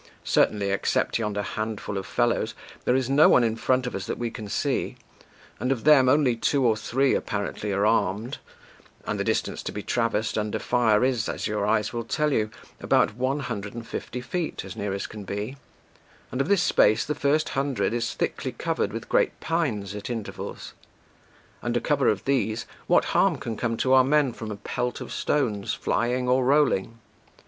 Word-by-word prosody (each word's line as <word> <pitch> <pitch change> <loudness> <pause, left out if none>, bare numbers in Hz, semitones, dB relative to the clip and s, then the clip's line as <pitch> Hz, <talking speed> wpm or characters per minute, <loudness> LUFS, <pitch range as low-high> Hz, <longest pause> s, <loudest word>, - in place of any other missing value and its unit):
Certainly, 100 -2 +2
except 95 - 0
yonder 105 -2 -2
handful 110 -1 -4
of 95 -1 -4
fellows, 120 -1 0 0.3
there 125 - +3
is 130 -2 +1
no 140 +3 +6
one 125 - +5
in 115 -1 +1
front 130 +2 +1
of 125 - -4
us 95 -1 -4
that - - -3
we 120 -1 -3
can 110 -2 -7
see; - - -1 0.6
and 125 - 0
of 125 -4 -1
them, 140 -4 +6
only 135 -3 +4
two 135 +3 +1
or 115 -2 +4
three 130 +5 +1
apparently 105 0 -2
are 100 +1 +1
armed, 110 +2 0 0.7
and - - -2
the - - +1
distance - - -1
to - - -5
be 105 - -6
traversed 115 -2 0
under 105 0 -2
fire 115 -2 +2
is, 125 -5 0
as - - -3
your 105 -1 -1
eyes 105 0 +1
will 120 0 -2
tell 150 +5 0
you, 110 -3 +1 0.3
about - - +2
one 130 +4 -1
hundred 100 -5 -5
and 120 -1 -6
fifty 125 - -5
feet 160 - -3
as 95 - -8
near 100 -1 -3
as 100 0 -3
can 105 -1 -8
be, 105 +6 -4 0.8
and 130 - -1
of - - -1
this 195 -3 +3
space 110 +3 +4
the 150 - -1
first 150 +2 +1
hundred 135 -6 -1
is 120 -1 -2
thickly - - -2
covered - - -1
with - - -6
great - - +1
pines 125 - -1
at 105 +2 -6
intervals; 115 -4 -6 0.9
under - - 0
cover - - +1
of - - +1
these, 120 -5 0 0.2
what - - +4
harm - - +3
can 115 - -5
come 115 0 -2
to 130 +3 +2
our 130 -1 +7
men 140 -1 +2
from 110 -2 -7
a 105 - -4
pelt 120 +4 -3
of - - -7
stones, 115 -6 0
flying 125 +3 0
6 - - -1
or 130 0 +3
rolling? 130 -6 +2
115 Hz, 195 wpm, -25 LUFS, 105-130 Hz, 0.9 s, our